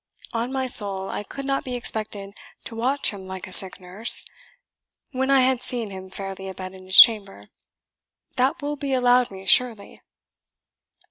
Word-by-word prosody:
On 235 +2 -3
my 265 -1 -2
soul, 195 -5 +3
I - - -4
could 275 +7 -9
not 275 0 -1
be 250 -1 -5
expected 215 -4 -5 0.3
to 225 - -7
watch 260 +5 0
him 195 -2 -11
like 190 -1 -7
a 185 - -9
sick 190 0 -4
nurse, 190 +6 +2 0.9
when 265 0 -2
I 275 -1 +5
had 255 -1 +1
seen 235 -5 -4
him 190 0 -10
fairly 195 0 -7
a 190 - -9
bed 185 0 -8
in 185 0 -14
his 185 - +8
chamber. 195 - +5 0.9
That 260 +3 -1
will 295 0 -4
be 275 -1 -4
allowed 250 -1 +2
me, 190 0 -12
surely." 225 -1 +2
220 Hz, 175 wpm, -22 LUFS, 190-255 Hz, 0.9 s, his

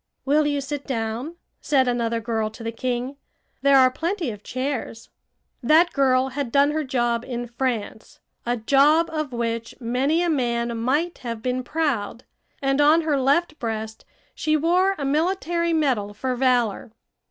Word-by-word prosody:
"Will 295 +2 +3
you 285 -1 0
sit 285 +1 -5
down?" 240 +5 -3 0.3
said 265 -3 +2
another 235 -1 0
girl 225 -1 -2
to 220 +2 -11
the 230 - -3
king. 250 +3 -3 0.4
"There 280 0 +5
are 255 -1 +6
plenty 335 - -2
of 210 -1 -10
chairs." 255 -2 -4 0.5
That 315 +7 +4
girl 265 -1 +2
had 270 -2 -4
done 280 +2 +4
her 310 +1 -1
job 240 -3 0
in 245 -1 -4
France 235 -3 -4 0.2
a 240 +1 -1
job 285 +8 +3
of 310 -3 -2
which 230 -1 -3
many 265 +8 +1
a - - +1
man 235 -4 -1
might 290 +10 -1
have 230 -2 -6
been 255 0 -1
proud 250 -6 -2 0.4
and 270 +1 +2
on 305 +3 +5
her 305 -3 0
left 305 +4 +1
breast 220 -1 -4 0.3
she 310 0 0
wore 360 +5 +2
a 280 - -3
military 340 +3 0
medal 255 -11 0
for 255 +3 -2
valor. 245 -4 +1
260 Hz, 160 wpm, -23 LUFS, 235-300 Hz, 0.5 s, are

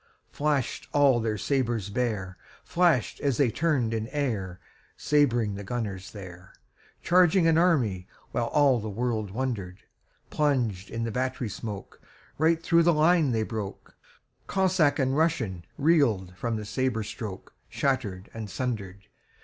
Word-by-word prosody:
Flash'd 145 -4 -1
all 140 -4 +5
their 110 -2 -1
sabres 115 -2 -1
bare, 100 -6 -2 0.3
Flash'd 170 -9 +1
as 140 -4 +1
they 130 -5 +3
turn'd 140 -9 0
in 110 0 -2
airSabring 115 - -1
the 100 - -6
gunners 100 -4 -4
there, 95 -2 -11 0.5
Charging 180 0 +4
an 165 -1 +4
army, 120 - +2 0.3
whileAll 125 +1 +2
the 110 - -4
world 110 -1 -2
wonder'd:Plunged 110 +1 -3
in 115 0 -3
the 115 - -2
battery 130 0 -2
smokeRight 120 - -3
thro' 170 0 +4
the 170 +1 +4
line 160 -1 +4
they 110 -2 +1
broke; 105 -3 -6 0.5
Cossack 185 -6 +2
and 130 -2 +1
RussianReel'd 135 - +1
from 115 +4 -2
the 105 -1 -4
sabre 115 +1 -1
strokeShatter'd 105 +1 -4
and 110 -2 -6
sunder'd. 100 -4 -4
120 Hz, 120 wpm, -27 LUFS, 105-145 Hz, 0.5 s, all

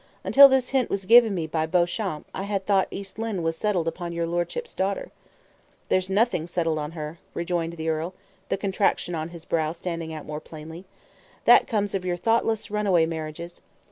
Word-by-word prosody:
"Until 280 0 +8
this 260 -1 +2
hint 265 -3 +1
was 195 -1 -2
given 230 -1 +6
me 165 -3 -2
by 160 0 -1
Beauchamp, 175 0 0
I - - -4
had 200 -1 -2
thought 195 -2 +3
East 195 +1 -8
Lynne 220 -6 -2
was 165 0 0
settled 180 -2 0
upon 170 +1 -4
your 170 0 -1
lordship's 175 - -3
daughter." 195 +1 -2 0.8
"There's 185 0 +1
nothing 195 -4 +1
settled 165 -3 -1
on 150 +1 -5
her," 155 0 -6 0.2
rejoined 170 -1 -2
the 160 -1 -5
earl, 160 +3 -2 0.3
the - - 0
contraction 195 -2 0
on 160 0 -3
his 170 -1 -11
brow 160 -1 0
standing 170 -2 -5
out 155 -1 -7
more 150 0 -5
plainly. 160 +3 -10 0.6
"That - - +7
comes 205 -3 -1
of 195 -2 -2
your 180 -1 -1
thoughtless 225 +1 0
runaway 200 -6 +3
marriages. 165 +1 -6
175 Hz, 185 wpm, -25 LUFS, 165-200 Hz, 0.8 s, Until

